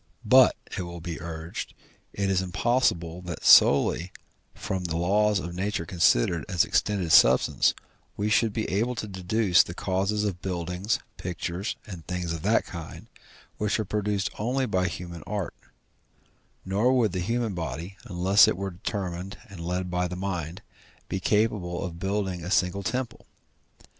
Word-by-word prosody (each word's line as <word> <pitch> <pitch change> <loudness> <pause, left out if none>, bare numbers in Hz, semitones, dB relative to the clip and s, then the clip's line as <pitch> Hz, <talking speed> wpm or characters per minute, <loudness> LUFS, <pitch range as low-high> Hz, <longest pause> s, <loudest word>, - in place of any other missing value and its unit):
But, - - +6 0.2
it - - -3
will 85 -1 -7
be 80 -1 -6
urged, 80 0 -6 0.4
it 100 -1 -1
is 95 -1 +2
impossible 90 -4 0
that 90 -3 -7
solely 85 +5 +6 0.4
from 95 -1 -4
the 80 -1 -2
laws 105 +4 +2
of 85 -1 -4
nature 95 -1 -2
considered 85 -2 +2
as 90 -4 +3
extended 95 -6 0
substance, 65 - +5 0.4
we 105 - 0
should 110 +1 +3
be 110 +1 -2
able 115 +7 0
to 110 - -4
deduce 95 0 +3
the 85 - -5
causes 100 +3 0
of 95 -4 -3
buildings, 90 +4 -2 0.2
pictures, 90 +3 -4
and 90 -6 -9
things 90 -2 -3
of 80 - -5
that 110 +6 +2
kind, 85 -3 -9 0.5
which 105 +1 0
are 110 - -1
produced 105 0 -1
only 130 +5 0
by 95 -5 0
human 85 -1 -7
art; 100 -2 -3 1.1
nor 105 +7 +2
would 110 -5 +2
the 90 - -3
human 115 +3 -1
body, 85 +3 -5
unless 95 +2 +5
it - - 0
were 100 0 -3
determined 90 0 -5
and 95 -3 -10
led 90 +2 -3
by 90 0 0
the 90 - -6
mind, 90 0 -4 0.5
be 95 - -2
capable 100 -3 0
of 85 -2 -7
building 95 -2 -2
a 90 - -5
single 95 0 +1
temple. 120 +5 -4
95 Hz, 160 wpm, -26 LUFS, 85-105 Hz, 1.1 s, But